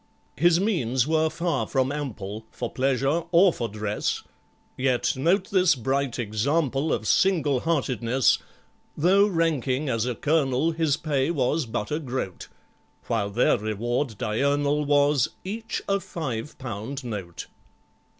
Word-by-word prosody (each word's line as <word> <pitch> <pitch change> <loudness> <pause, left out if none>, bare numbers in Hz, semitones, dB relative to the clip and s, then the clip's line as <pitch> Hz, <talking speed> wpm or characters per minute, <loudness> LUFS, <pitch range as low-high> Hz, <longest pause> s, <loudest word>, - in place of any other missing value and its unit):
His 170 +3 +4
means 130 - +1
were 160 0 +2
far 170 +2 -1
from 130 -1 0
ample 110 -7 -5
For 120 - -5
pleasure 135 +4 +1
or 180 +1 +6
for 120 - -3
dress, 105 0 -2 0.5
Yet 130 -1 +1
note 170 - +1
this 185 -3 +4
bright 135 0 -1
example 135 +6 0
Of 110 0 -1
single 155 -9 +3
heartedness: 130 -5 +1 0.6
Though 195 +6 +4
ranking 155 - 0
as 115 -1 0
a 125 - -2
Colonel, 145 +1 +1
His 160 -3 +1
pay 145 -2 0
was 145 -2 0
but 105 +1 -3
a 150 - 0
groat, 130 - -5 0.6
While 105 -3 -1
their 115 +2 +2
reward 115 +3 -2
diurnal 140 +6 +1
Was—each 145 - 0
a 200 0 +2
five 150 - -5
pound 130 +2 -6
note. 100 -8 -6
135 Hz, 130 wpm, -25 LUFS, 120-160 Hz, 0.6 s, or